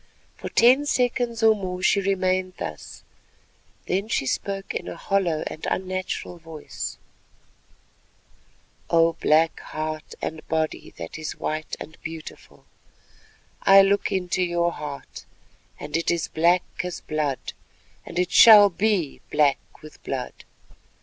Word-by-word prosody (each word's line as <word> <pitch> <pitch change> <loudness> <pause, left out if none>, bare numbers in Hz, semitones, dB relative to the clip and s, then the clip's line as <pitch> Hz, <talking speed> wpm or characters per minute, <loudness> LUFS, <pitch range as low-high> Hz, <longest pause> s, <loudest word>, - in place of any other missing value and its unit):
For - - -7
ten 255 +5 +4
seconds 245 -3 0
or 220 0 +7
more 185 -2 -5
she 200 - +3
remained 185 -1 0
thus, 75 - -7 0.8
then 195 +3 -1
she 220 - -1
spoke 195 +8 -3
in - - -4
a - - -6
hollow 180 -6 0
and 155 - -7
unnatural 185 -1 -4
voice:— 160 -2 -7 1.9
"O 165 0 +4
Black 160 0 +2
Heart 155 0 -6
and 155 0 -5
body 160 -1 -2
that 85 - -7
is 155 - -5
white 155 0 -3
and 160 - -11
beautiful, 160 -1 -10 1.0
I 195 0 +7
look 200 +1 +1
into 185 -1 -1
your 175 -1 +1
heart, 145 -3 -8 0.5
and 150 +1 -6
it 165 0 0
is 170 -1 0
black 175 +3 +3 0.2
as 180 -2 -5
blood, 150 -3 -3 0.5
and 170 - -9
it 180 0 0
shall 210 -3 +9
be 190 -5 0
black 145 -2 0
with 155 - -13
blood. 130 -2 -4
175 Hz, 130 wpm, -24 LUFS, 155-195 Hz, 1.9 s, shall